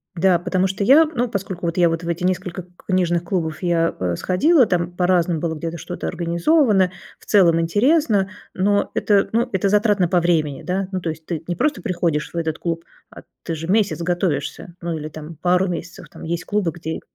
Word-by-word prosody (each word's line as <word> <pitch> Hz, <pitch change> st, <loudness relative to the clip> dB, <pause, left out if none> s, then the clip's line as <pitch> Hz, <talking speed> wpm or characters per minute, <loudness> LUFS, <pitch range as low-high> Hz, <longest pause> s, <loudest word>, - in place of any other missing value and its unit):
да, 180 Hz, 0 st, +3 dB
потому 185 Hz, +2 st, 0 dB
что 190 Hz, +2 st, -3 dB
я, 285 Hz, +5 st, +7 dB
ну, 250 Hz, -6 st, -2 dB
поскольку 190 Hz, -5 st, -4 dB
вот 170 Hz, 0 st, -1 dB
я 175 Hz, -1 st, +5 dB
вот 165 Hz, +1 st, -3 dB
в -, -, -6 dB
эти 170 Hz, +1 st, -2 dB
несколько 185 Hz, 0 st, -2 dB
к 175 Hz, 0 st, -24 dB
книжных 175 Hz, -2 st, +1 dB
клубов 165 Hz, -3 st, -2 dB
я, 170 Hz, -2 st, +1 dB
э, 90 Hz, -2 st, -1 dB
сходила, 255 Hz, -, +3 dB
там 175 Hz, -3 st, -1 dB
по-разному 180 Hz, -2 st, +2 dB
было 165 Hz, -2 st, -2 dB
где-то 165 Hz, +2 st, -5 dB
что-то 175 Hz, +2 st, -6 dB
организовано, 185 Hz, -, +2 dB, 0.3 s
в -, -, -20 dB
целом 170 Hz, -5 st, +4 dB
интересно, 205 Hz, -, +2 dB, 0.2 s
но 205 Hz, +2 st, +1 dB
это, 200 Hz, -2 st, +2 dB
ну, 240 Hz, +2 st, +1 dB
это 190 Hz, 0 st, +1 dB
затратно 205 Hz, -3 st, +3 dB
по 175 Hz, 0 st, +2 dB
времени, 155 Hz, -5 st, 0 dB
да. 185 Hz, +1 st, -2 dB
Ну, 185 Hz, -, -2 dB
то 170 Hz, -, -2 dB
есть 160 Hz, 0 st, -7 dB
ты 165 Hz, -2 st, -4 dB
не 175 Hz, -, -2 dB
просто 295 Hz, +3 st, 0 dB
приходишь 170 Hz, -7 st, -1 dB
в -, -, -5 dB
этот 160 Hz, -1 st, -2 dB
клуб, 165 Hz, -1 st, -3 dB, 0.2 s
а -, -, -13 dB, 0.2 s
ты 165 Hz, -, -3 dB
же 160 Hz, +1 st, -6 dB
месяц 205 Hz, -1 st, +1 dB
готовишься, 170 Hz, -2 st, -2 dB
ну 170 Hz, -1 st, -3 dB
или 155 Hz, 0 st, -6 dB
там 155 Hz, +1 st, -9 dB
пару 180 Hz, +4 st, +2 dB
месяцев, 175 Hz, -1 st, -6 dB
там -, -, -12 dB
есть 170 Hz, +2 st, -3 dB
клубы, 205 Hz, -5 st, 0 dB
где 160 Hz, -1 st, -6 dB
175 Hz, 205 wpm, -21 LUFS, 165-195 Hz, 0.3 s, я